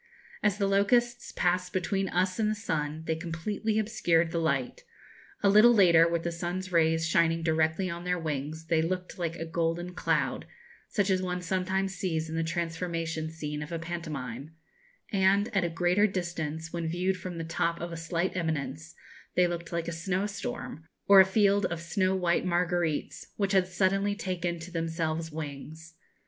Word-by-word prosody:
As 205 Hz, -2 st, +2 dB
the 200 Hz, -, +1 dB
locusts 240 Hz, +5 st, +2 dB
passed 180 Hz, 0 st, 0 dB
between 195 Hz, 0 st, 0 dB
us 185 Hz, +3 st, 0 dB
and 215 Hz, -1 st, +2 dB
the 215 Hz, -, 0 dB
sun 160 Hz, -7 st, -3 dB
they 160 Hz, -, 0 dB
completely 185 Hz, +6 st, -2 dB
obscured 175 Hz, -7 st, +2 dB
the 170 Hz, -, -1 dB
light; 140 Hz, -6 st, -1 dB, 0.6 s
a -, -, +5 dB
little 215 Hz, +4 st, +7 dB
later, 170 Hz, -5 st, +6 dB
with 170 Hz, -1 st, -1 dB
the 170 Hz, -, -1 dB
sun's 175 Hz, +2 st, -4 dB
rays 160 Hz, -1 st, +3 dB
shining 165 Hz, 0 st, +2 dB
directly 160 Hz, +3 st, +1 dB
on 170 Hz, 0 st, -5 dB
their 180 Hz, 0 st, 0 dB
wings, 155 Hz, 0 st, -4 dB
they 160 Hz, -1 st, +2 dB
looked 180 Hz, +3 st, -3 dB
like 170 Hz, -1 st, -2 dB
a 165 Hz, -, -5 dB
golden 165 Hz, +2 st, -2 dB
cloud, -, -, 0 dB, 0.4 s
such 200 Hz, -3 st, 0 dB
as 185 Hz, -1 st, +2 dB
one 180 Hz, -1 st, -2 dB
sometimes 190 Hz, +2 st, -1 dB
sees 165 Hz, -4 st, -2 dB
in 160 Hz, -, -4 dB
the 165 Hz, -, 0 dB
transformation 165 Hz, -1 st, -2 dB
scene 150 Hz, -2 st, -5 dB
of 150 Hz, +3 st, -7 dB
a 170 Hz, -, -2 dB
pantomime; 155 Hz, -5 st, -6 dB, 0.6 s
and, 200 Hz, +2 st, +2 dB
at 195 Hz, -, +3 dB
a 170 Hz, -, 0 dB
greater 175 Hz, +5 st, +3 dB
distance, 165 Hz, -4 st, -4 dB
when 170 Hz, -1 st, -2 dB
viewed 180 Hz, +3 st, 0 dB
from 180 Hz, -1 st, -7 dB
the 165 Hz, -, -3 dB
top 170 Hz, +1 st, -1 dB
of 170 Hz, 0 st, -5 dB
a -, -, -5 dB
slight 165 Hz, +3 st, -2 dB
eminence, 160 Hz, -2 st, -3 dB, 0.4 s
they 180 Hz, -, +5 dB
looked 170 Hz, -1 st, -4 dB
like 170 Hz, -1 st, -2 dB
a -, -, -2 dB
snow 180 Hz, +4 st, -1 dB
storm, 210 Hz, -5 st, -5 dB, 0.2 s
or 200 Hz, -1 st, +9 dB
a 190 Hz, -, +9 dB
field 200 Hz, 0 st, +3 dB
of 170 Hz, -, -4 dB
snow 185 Hz, +2 st, 0 dB
white 175 Hz, -2 st, +1 dB
marguerites, 175 Hz, -3 st, -1 dB
which 200 Hz, -2 st, 0 dB
had 190 Hz, -2 st, +3 dB
suddenly 195 Hz, +2 st, +1 dB
taken 180 Hz, -3 st, -2 dB
to 165 Hz, +2 st, -9 dB
themselves 165 Hz, -1 st, -2 dB
wings. 155 Hz, +2 st, -7 dB
170 Hz, 180 wpm, -29 LUFS, 160-190 Hz, 0.6 s, or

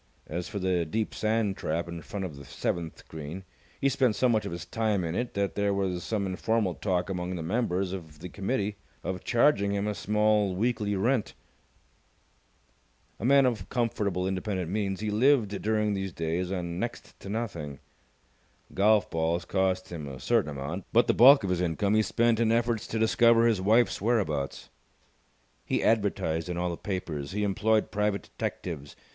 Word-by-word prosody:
As 85 Hz, +3 st, -4 dB
for 105 Hz, -, -5 dB
the 95 Hz, -3 st, +1 dB
deep 105 Hz, +7 st, -2 dB
sand 110 Hz, -2 st, 0 dB
trap 85 Hz, +2 st, -2 dB
in 85 Hz, -1 st, -6 dB
front 95 Hz, +4 st, -5 dB
of 80 Hz, -6 st, -7 dB
the 70 Hz, -, -10 dB
seventh 85 Hz, +3 st, -4 dB
green, 80 Hz, +4 st, -7 dB, 0.4 s
he 140 Hz, -, +2 dB
spent 130 Hz, -4 st, +2 dB
so 130 Hz, -, +3 dB
much 110 Hz, -4 st, +1 dB
of -, -, -5 dB
his 85 Hz, 0 st, -6 dB
time 105 Hz, -1 st, 0 dB
in 80 Hz, -1 st, -2 dB
it 120 Hz, +6 st, -3 dB
that 100 Hz, 0 st, 0 dB
there 100 Hz, -1 st, +1 dB
was 95 Hz, -3 st, -1 dB
some 105 Hz, +1 st, -1 dB
informal 95 Hz, +1 st, 0 dB
talk 90 Hz, -2 st, -1 dB
among 90 Hz, -1 st, -3 dB
the 85 Hz, -, -4 dB
members 95 Hz, -1 st, -1 dB
of 80 Hz, -5 st, -8 dB
the 85 Hz, +4 st, -7 dB
committee 100 Hz, +1 st, -2 dB, 0.3 s
of 90 Hz, -1 st, -4 dB
charging 115 Hz, -5 st, +3 dB
him 100 Hz, 0 st, -1 dB
a 105 Hz, -, -1 dB
small 105 Hz, -1 st, +1 dB
weekly 105 Hz, -1 st, 0 dB
rent. 115 Hz, +4 st, 0 dB, 1.8 s
A 110 Hz, -, -4 dB
man 140 Hz, +1 st, +6 dB
of 110 Hz, -7 st, -1 dB
comfortable 105 Hz, -6 st, -1 dB
independent 95 Hz, -2 st, -2 dB
means, 100 Hz, -1 st, -1 dB
he 110 Hz, -1 st, -1 dB
lived 110 Hz, -3 st, +3 dB
during 105 Hz, -1 st, +1 dB
these 95 Hz, -1 st, -3 dB
days 85 Hz, +3 st, -2 dB
on 85 Hz, -2 st, -3 dB
next 120 Hz, +2 st, -5 dB
to 100 Hz, -, -9 dB
nothing. 85 Hz, -11 st, -4 dB, 1.0 s
Golf 105 Hz, +1 st, +4 dB
balls 85 Hz, +1 st, -1 dB
cost 95 Hz, 0 st, 0 dB
him 80 Hz, -4 st, -6 dB
a 65 Hz, -2 st, -8 dB
certain 65 Hz, +3 st, +1 dB
amount, 70 Hz, +6 st, -5 dB
but 120 Hz, +2 st, +5 dB
the -, -, +2 dB
bulk 135 Hz, +1 st, +8 dB
of 95 Hz, -, -1 dB
his 90 Hz, -1 st, 0 dB
income 90 Hz, +4 st, 0 dB
he 110 Hz, -, +5 dB
spent 115 Hz, +1 st, +2 dB
in 115 Hz, -1 st, +3 dB
efforts 115 Hz, -1 st, +1 dB
to 115 Hz, -, -3 dB
discover 115 Hz, +1 st, +4 dB
his 110 Hz, -5 st, +2 dB
wife's 110 Hz, +5 st, +3 dB
whereabouts. 95 Hz, -, -1 dB, 0.9 s
He -, -, -1 dB
advertised 90 Hz, -7 st, +1 dB
in 90 Hz, -, -3 dB
all 90 Hz, 0 st, -1 dB
the -, -, -3 dB
papers. 85 Hz, -7 st, -4 dB
He 105 Hz, +1 st, -1 dB
employed 105 Hz, +2 st, +1 dB
private 105 Hz, -2 st, 0 dB
detectives. 75 Hz, -6 st, -5 dB
100 Hz, 180 wpm, -28 LUFS, 90-110 Hz, 1.8 s, bulk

